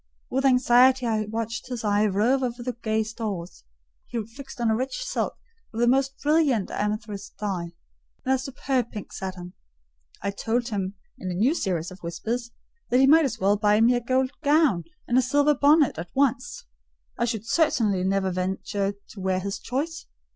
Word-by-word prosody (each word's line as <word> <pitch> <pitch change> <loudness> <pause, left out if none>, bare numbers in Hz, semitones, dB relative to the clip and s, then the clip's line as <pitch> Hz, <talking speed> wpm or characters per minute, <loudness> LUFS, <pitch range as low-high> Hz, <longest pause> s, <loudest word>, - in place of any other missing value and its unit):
With 265 +1 0
anxiety 255 0 +5
I 220 -2 0
watched 225 +1 -4
his 245 -3 -5
eye 210 0 +3
rove 220 +7 +2
over 245 -1 -3
the 250 0 -2
gay 220 -1 +1
stores: 210 - -6 0.4
he 230 -3 -3
fixed 270 +4 -11
on 230 -2 +2
a - - +2
rich 265 - -3
silk - - -2 0.4
of 225 - -6
the 240 - +4
most 270 +2 +2
brilliant 290 - +2
amethyst 210 -1 -4
dye, 180 -5 -3 0.5
and 260 - +3
a 265 - +1
superb 265 -2 -2
pink 210 -3 -8
satin. 185 -2 -6 0.7
I 200 - 0
told 235 +4 -1
him 195 -2 -3 0.2
in 185 - -4
a 180 - -3
new 235 - +3
series 180 - -2
of 185 0 -12
whispers, 225 +8 -3 0.4
that 250 - +4
he 270 - +6
might 315 +3 +6
as 235 -4 -2
well 200 0 +2
buy 210 +1 +3
me 235 +2 +5
a 245 - 0
gold 255 +2 +1
gown 290 - +3 0.2
and 245 +1 +4
a - - +5
silver 285 +3 +3
bonnet 290 - +4
at 170 +1 -6
once: 265 -2 0 0.5
I 235 - +2
should 225 -3 -3
certainly 225 - +2
never 190 0 +1
venture 190 +2 -2 0.2
to 210 - -11
wear 190 0 0
his 195 +1 -4
choice. 310 +6 -4
230 Hz, 185 wpm, -25 LUFS, 200-260 Hz, 0.7 s, he